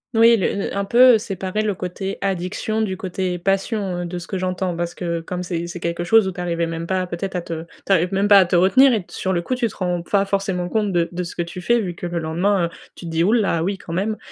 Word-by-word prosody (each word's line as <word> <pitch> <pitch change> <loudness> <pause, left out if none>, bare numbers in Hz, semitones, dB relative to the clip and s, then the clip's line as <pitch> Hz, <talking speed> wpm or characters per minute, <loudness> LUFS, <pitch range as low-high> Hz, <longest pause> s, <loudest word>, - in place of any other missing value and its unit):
Oui 230 +1 +6
le 190 - 0
le 200 - -3
un 200 0 -1
peu 245 +1 +6
séparer 195 -1 -3
le 210 -2 -1
côté 190 +2 -4
addiction 195 +3 -2
du 190 -4 -2
côté 185 -1 -3
passion, 195 0 -1
heu, - - -3
de 180 - -5
ce 175 - -6
que 190 +2 -4
j'entends 185 -1 -2
parce 170 0 -3
que 170 -2 -2
comme 180 +2 -5
c'est 170 -1 -3
c'est 175 +1 -7
quelque 170 +1 -2
chose 215 +3 +4
où - - -1
tu 180 - -6
arrivais 170 -1 -1
même 165 0 -5
pas, 185 -1 0
peut-être, 180 +2 -5
à 180 - -1
te 165 -1 -5 0.2
tu - - -2
arrives 180 0 +2
même 195 +1 +1
pas 200 -1 +8
à 185 - +5
te 180 - +1
retenir 195 +10 +6
et 215 -7 0
sur 190 0 -3
le 175 - -1
coup 255 - -2
tu 250 -2 0
te 215 - -10
rends 180 -1 -1
pas 195 +3 +1
forcément 195 -2 -1
compte 210 +1 0
de 170 -2 +1
de 180 +1 -3
ce 170 - -7
que 175 - -1
tu 175 +2 -8
fais, 235 +6 +2
vu 185 -5 -3
que 175 +1 -6
le 175 - -3
lendemain, 170 +4 +1
heu, - - -3 0.3
tu - - -10
te 165 - -5
dis: 165 +1 +1
«Ouh 210 +5 +3
là, 195 -8 +2
oui, 195 +3 -1
quand 165 - -8
même!» 210 +5 -1
185 Hz, 285 wpm, -21 LUFS, 175-200 Hz, 0.3 s, pas